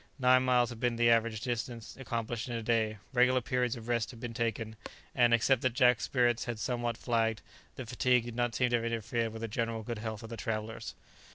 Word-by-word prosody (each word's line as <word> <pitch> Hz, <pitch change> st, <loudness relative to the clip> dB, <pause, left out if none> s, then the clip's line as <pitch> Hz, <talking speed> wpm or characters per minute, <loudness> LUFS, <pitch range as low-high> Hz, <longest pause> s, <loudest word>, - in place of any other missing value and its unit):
Nine 130 Hz, -1 st, +5 dB
miles 125 Hz, -1 st, +3 dB
had 115 Hz, -, -8 dB
been 120 Hz, -1 st, +1 dB
the 120 Hz, 0 st, +4 dB
average 115 Hz, -1 st, +2 dB
distance 115 Hz, -2 st, -4 dB
accomplished 115 Hz, -2 st, -4 dB
in 120 Hz, -, -3 dB
a 115 Hz, -, -3 dB
day; 110 Hz, -2 st, +1 dB, 0.2 s
regular 125 Hz, +1 st, +4 dB
periods 125 Hz, -2 st, 0 dB
of 115 Hz, -1 st, -9 dB
rest 120 Hz, -2 st, 0 dB
had 120 Hz, -, -11 dB
been 120 Hz, 0 st, -5 dB
taken, 115 Hz, -2 st, -2 dB, 0.4 s
and, 120 Hz, -2 st, +4 dB
except 120 Hz, +2 st, +3 dB
that 130 Hz, -2 st, +1 dB
Jack's 125 Hz, -4 st, +4 dB
spirits 120 Hz, -2 st, +1 dB
had 120 Hz, -2 st, -3 dB
somewhat 120 Hz, 0 st, -2 dB
flagged, 115 Hz, -3 st, 0 dB, 0.3 s
the 130 Hz, -, -6 dB
fatigue 125 Hz, +1 st, +2 dB
did 120 Hz, -1 st, -7 dB
not 120 Hz, -1 st, 0 dB
seem 125 Hz, -1 st, +2 dB
to 120 Hz, -, +4 dB
have 115 Hz, -, -3 dB
interfered 115 Hz, 0 st, -1 dB
with 110 Hz, +1 st, -7 dB
the -, -, -1 dB
general 115 Hz, 0 st, -2 dB
good 115 Hz, 0 st, -4 dB
health 110 Hz, 0 st, -5 dB
of 115 Hz, -, -8 dB
the 115 Hz, -, -5 dB
travellers. 110 Hz, 0 st, -4 dB
115 Hz, 220 wpm, -31 LUFS, 115-125 Hz, 0.4 s, Nine